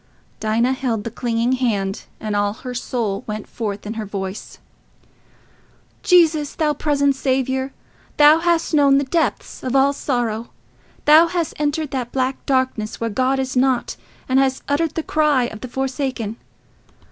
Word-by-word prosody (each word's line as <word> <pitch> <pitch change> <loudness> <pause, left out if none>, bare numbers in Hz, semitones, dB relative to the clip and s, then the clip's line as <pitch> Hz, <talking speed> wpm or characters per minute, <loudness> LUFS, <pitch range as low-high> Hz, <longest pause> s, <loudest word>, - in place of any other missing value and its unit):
Dinah 230 +4 +1
held 245 -5 -2
the 230 - -5
clinging 235 +1 -1
hand, 210 -7 -1
and 215 -1 -3
all 205 0 +1
her 250 +2 -7
soul 235 -4 -2
went 215 -1 -4
forth 210 -3 -5
in 210 - -4
her 220 -1 -5
voice: 195 0 -6 1.4
"Jesus, 330 -7 +3
thou 305 -2 +1
present 285 -1 +1
Saviour! 265 0 -1 0.5
Thou 300 +2 +7
hast 340 -1 +1
known 280 -2 +5
the 280 - +2
depths 275 - -1
of 255 +1 -2
all 275 +1 +4
sorrow: 235 -5 -2 0.6
thou 310 +3 +7
hast 340 -2 -2
entered 295 0 -1
that 250 -3 -3
black 260 0 -1
darkness 260 -5 0
where 230 -1 -2
God 260 +5 +1
is 265 -1 -2
not, 255 -1 +1 0.3
and 260 +1 +3
hast 265 -1 +1
uttered 305 +2 0
the 325 - -2
cry 300 -5 +2
of 220 -3 -5
the 255 - -5
forsaken. 260 -3 -3
260 Hz, 155 wpm, -20 LUFS, 230-285 Hz, 1.4 s, Thou